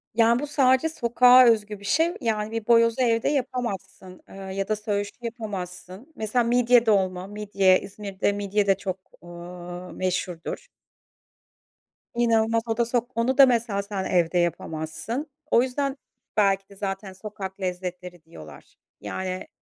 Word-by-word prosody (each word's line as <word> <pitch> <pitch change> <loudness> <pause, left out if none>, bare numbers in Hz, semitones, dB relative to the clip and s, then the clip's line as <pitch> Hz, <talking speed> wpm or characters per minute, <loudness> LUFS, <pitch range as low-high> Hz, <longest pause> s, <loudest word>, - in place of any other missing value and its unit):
Ya, 230 +1 +4
bu 295 - -4
sadece 270 +1 +3
sokağa 250 -2 +6
özgü 215 -3 +2
bir 200 - -12
şey. 325 +10 +2
Yani, 215 -3 -1
bir 225 -1 -4
boyozu 230 +1 +4
evde 230 -2 +2
yapamazsın, 235 -9 -4
ııı, 195 0 -8
ya 195 0 -2
da 215 - +1
söğüşü 205 -1 -2
yapamazsın. 210 - -7
Mesela, 220 +3 0
midye 240 0 +4
dolma; 190 -4 +1
midye 200 -2 +2
İzmir'de, 200 0 -3
midye 205 0 -1
de, - - +5
eee, 190 - +2
çok 190 -1 -4 1.0
meşhurdur. 180 - -3 1.5
İnanılmaz 230 -1 +2
o 225 -1 -1
da 235 - +2
sok 240 +1 -1
onu 235 +3 0
da 275 - +10
mesela 230 -5 +1
sen 200 -1 -4
evde 175 -1 +1
yapamazsın. 170 - -3 0.2
O 235 - +6
yüzden 275 +2 -2 0.4
belki 195 -2 +2
de 200 - -15
zaten 195 0 -5
sokak 195 0 -8
lezzetleri 180 -1 -5
diyorlar. 80 - -14 0.3
Yani, 185 0 -4
210 Hz, 140 wpm, -25 LUFS, 190-235 Hz, 1.5 s, da